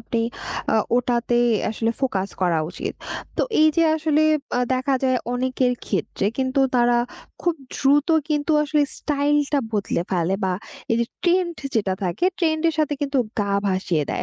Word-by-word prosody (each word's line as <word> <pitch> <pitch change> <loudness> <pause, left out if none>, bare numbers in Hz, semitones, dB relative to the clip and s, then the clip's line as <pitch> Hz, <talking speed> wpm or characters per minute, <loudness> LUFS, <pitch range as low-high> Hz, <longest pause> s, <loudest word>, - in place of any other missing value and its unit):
আপনি 230 0 -2 0.5
আ - - +4 0.2
ওটাতে 240 -1 +1 0.3
আসলে 225 +1 -1
ফোকাস 200 -8 0
করা 175 -3 +2
উচিত। - - -4 0.4
তো - - +2 0.2
এই 310 - +7
যে 335 - +5
আসলে 310 -1 +2 0.4
আ - - +2
দেখা 265 +1 0
যায় 260 -1 +3 0.2
অনেকের 255 0 +1
ক্ষেত্রে 195 +1 -1
কিন্তু 260 +1 +1 0.2
তারা 240 0 +4 0.5
খুব 345 -1 +1 0.2
দ্রুত 290 +3 +3 0.2
কিন্তু 295 0 0
আসলে 300 0 +2 0.2
স্টাইলটা 290 0 +1
বদলে 200 -4 0
ফেলে। 175 0 +1
বা 185 - +1 0.4
এই 230 - +3
যে - - +2 0.2
ট্রেন্ড 350 -1 +2 0.2
যেটা 200 -4 +1
থাকে 185 - -1
ট্রেন্ড 315 -2 +1
এর 325 - -1
সাথে 300 -1 +1
কিন্তু 280 -2 0 0.2
গা 200 -1 0
ভাসিয়ে 185 -5 0
দেয়। - - -2
260 Hz, 160 wpm, -23 LUFS, 210-295 Hz, 0.5 s, এই